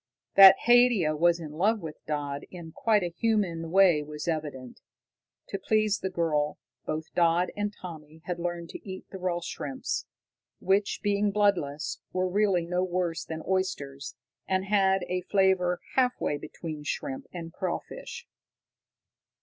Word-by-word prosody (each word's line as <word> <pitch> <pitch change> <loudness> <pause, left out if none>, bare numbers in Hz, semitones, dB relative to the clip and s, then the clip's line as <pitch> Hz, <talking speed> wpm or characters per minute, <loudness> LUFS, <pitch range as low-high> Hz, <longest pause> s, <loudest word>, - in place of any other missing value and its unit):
That 195 -1 +10
Haidia 240 -10 +5
was 170 +2 +3
in 155 -3 -7
love 205 +8 +1
with 160 -4 -9
Dodd 145 -2 -3
in 170 -3 -9
quite 210 +2 +2
a 175 -1 -3
human 190 -8 0
way 180 -4 +5
was 150 +2 -7
evident. 145 -6 -4 0.7
To 195 - -3
please 215 +1 +1
the 190 - -2
girl, 155 -5 0 0.3
both 155 +1 -4
Dodd 170 +1 +2
and 205 0 -1
Tommy 160 -5 -11
had 175 -1 -3
learned 170 -1 -4
to - - -8
eat 190 -1 -8
the 190 - -7
raw 180 -1 -1
shrimps, 145 -5 -4 0.5
which, 195 +2 +1
being 205 0 +2
bloodless, 195 -8 0
were 185 0 +1
really 190 -2 +2
no 180 +1 0
worse 175 -3 -1
than 160 -1 -6
oysters, 145 -8 -2 0.3
and 190 0 0
had 195 -2 +3
a 180 0 -1
flavor 185 -2 +2
half 250 -1 +2
way 145 - 0
between 155 -1 -7
shrimp 270 - -4
and 165 -2 -7
crawfish. - - -5
180 Hz, 150 wpm, -28 LUFS, 160-195 Hz, 0.7 s, That